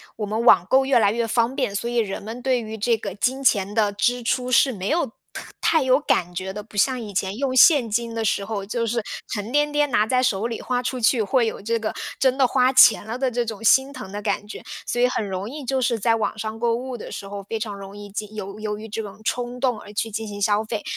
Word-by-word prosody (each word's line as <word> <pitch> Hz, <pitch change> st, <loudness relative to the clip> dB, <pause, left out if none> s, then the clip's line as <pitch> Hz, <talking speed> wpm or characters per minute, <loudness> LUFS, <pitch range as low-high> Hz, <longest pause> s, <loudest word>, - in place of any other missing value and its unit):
我 210 Hz, -, -3 dB
们 220 Hz, +3 st, -2 dB
网 180 Hz, -7 st, +6 dB
购 265 Hz, +4 st, +4 dB
越 265 Hz, -2 st, +3 dB
来 205 Hz, -3 st, +4 dB
越 230 Hz, 0 st, -1 dB
方 235 Hz, +3 st, +1 dB
便， 250 Hz, -8 st, -1 dB
所 235 Hz, +3 st, -2 dB
以 240 Hz, -, -2 dB
人 210 Hz, -4 st, -1 dB
们 225 Hz, +4 st, -7 dB
对 255 Hz, -1 st, +1 dB
于 220 Hz, -1 st, -6 dB
这 230 Hz, +2 st, +1 dB
个 200 Hz, -3 st, -6 dB
金 260 Hz, +7 st, -1 dB
钱 200 Hz, -5 st, +2 dB
的 210 Hz, -2 st, +2 dB
支 240 Hz, +4 st, 0 dB
出 250 Hz, +2 st, -1 dB
是 260 Hz, +2 st, +5 dB
没 190 Hz, -3 st, -4 dB
有 330 Hz, 0 st, +2 dB, 0.3 s
太 -, -, -9 dB
太 320 Hz, -4 st, +3 dB
有 260 Hz, +1 st, +4 dB
感 180 Hz, -, 0 dB
觉 190 Hz, +2 st, -3 dB
的。 210 Hz, +2 st, -6 dB
不 215 Hz, -, -18 dB
像 255 Hz, +5 st, +2 dB
以 210 Hz, -3 st, -7 dB
前 195 Hz, +2 st, -2 dB
用 265 Hz, -1 st, -1 dB
现 270 Hz, -2 st, +6 dB
金 230 Hz, +1 st, -1 dB
的 225 Hz, -, -1 dB
时 200 Hz, -1 st, +1 dB
候， 200 Hz, -2 st, -4 dB
就 230 Hz, +3 st, -2 dB
是 235 Hz, +1 st, 0 dB, 0.3 s
沉 210 Hz, +1 st, -4 dB
甸 295 Hz, 0 st, +2 dB
甸 295 Hz, 0 st, +1 dB
拿 215 Hz, -2 st, +3 dB
在 255 Hz, +2 st, +2 dB
手 215 Hz, -2 st, +1 dB
里 230 Hz, -2 st, -5 dB
花 250 Hz, -1 st, -1 dB
出 255 Hz, 0 st, -2 dB
去， 230 Hz, 0 st, +3 dB
会 240 Hz, +3 st, +2 dB
有 220 Hz, -, -4 dB
这 230 Hz, +3 st, 0 dB
个 220 Hz, -1 st, -3 dB, 0.3 s
真 260 Hz, -1 st, +3 dB
的 270 Hz, -, +5 dB
花 255 Hz, +2 st, +2 dB
钱 230 Hz, -5 st, +7 dB
了 225 Hz, +2 st, -4 dB
的 260 Hz, 0 st, 0 dB
这 240 Hz, 0 st, -1 dB
种 220 Hz, -1 st, -6 dB
心 265 Hz, +5 st, +4 dB
疼 250 Hz, -7 st, -8 dB
的 205 Hz, 0 st, -5 dB
感 205 Hz, -, -1 dB
觉。 210 Hz, -, -8 dB, 0.3 s
所 240 Hz, -, -1 dB
以 250 Hz, -, +5 dB
很 240 Hz, -3 st, -2 dB
容 190 Hz, +3 st, -4 dB
易 290 Hz, +2 st, -7 dB
就 265 Hz, 0 st, -1 dB
是 245 Hz, -2 st, +1 dB
在 225 Hz, +2 st, +2 dB
网 220 Hz, 0 st, -2 dB
上 220 Hz, +1 st, -5 dB
购 235 Hz, -1 st, +1 dB
物 250 Hz, +1 st, -5 dB
的 -, -, -8 dB
时 -, -, -6 dB
候， 200 Hz, 0 st, -7 dB
非 225 Hz, +3 st, -4 dB
常 215 Hz, -2 st, -4 dB
容 195 Hz, 0 st, -10 dB
易 205 Hz, 0 st, -9 dB
进 210 Hz, +1 st, -6 dB
由 200 Hz, 0 st, -6 dB
由 210 Hz, -1 st, -3 dB
于 220 Hz, +1 st, -9 dB
这 220 Hz, +2 st, -3 dB
种 215 Hz, 0 st, -10 dB
冲 245 Hz, +2 st, -3 dB
动 250 Hz, -5 st, +1 dB
而 205 Hz, 0 st, -12 dB
去 225 Hz, +1 st, -2 dB
进 220 Hz, +1 st, -4 dB
行 205 Hz, 0 st, -7 dB
消 205 Hz, +1 st, +2 dB
费。 215 Hz, -1 st, -4 dB
225 Hz, 295 characters per minute, -23 LUFS, 205-250 Hz, 0.3 s, 钱